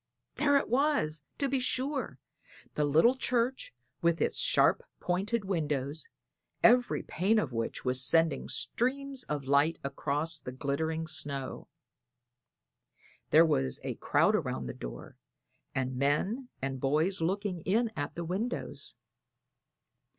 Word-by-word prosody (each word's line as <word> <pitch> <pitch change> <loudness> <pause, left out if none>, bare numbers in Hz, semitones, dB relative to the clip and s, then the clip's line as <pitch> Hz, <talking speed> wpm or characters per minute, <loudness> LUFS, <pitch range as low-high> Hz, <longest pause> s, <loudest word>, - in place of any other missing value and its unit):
There 285 -1 +4
it - - 0
was, 245 - +1 0.2
to 280 - 0
be 270 0 0
sure 265 +2 -1 0.6
the 150 - +1
little 160 - +5
church 255 0 -1 0.3
with 170 0 +2
its - - 0
sharp - - +3 0.2
pointed 200 +5 -1
windows, 150 -5 -2 0.6
every 245 +1 +4
pane 200 +7 +1
of 145 - 0
which 115 +2 -3
was 130 +1 +1
sending 160 -1 +2
streams 260 - 0
of 145 -2 -3
light 140 +4 +3
across 145 +3 -1
the 125 - -7
glittering 160 +4 -2
snow. 140 -4 -2 1.6
There 160 +2 +7
was 65 - 0
a - - -2
crowd - - +2
around 65 - -2
the 60 - -5
door, - - -9 0.6
and 130 -1 -1
men 190 - 0
and 135 -1 -2
boys 155 +8 +1
looking 185 +1 -1
in 220 +6 +1
at 145 - -4
the 170 - -4
windows. 200 +8 -4
165 Hz, 130 wpm, -30 LUFS, 140-235 Hz, 1.6 s, There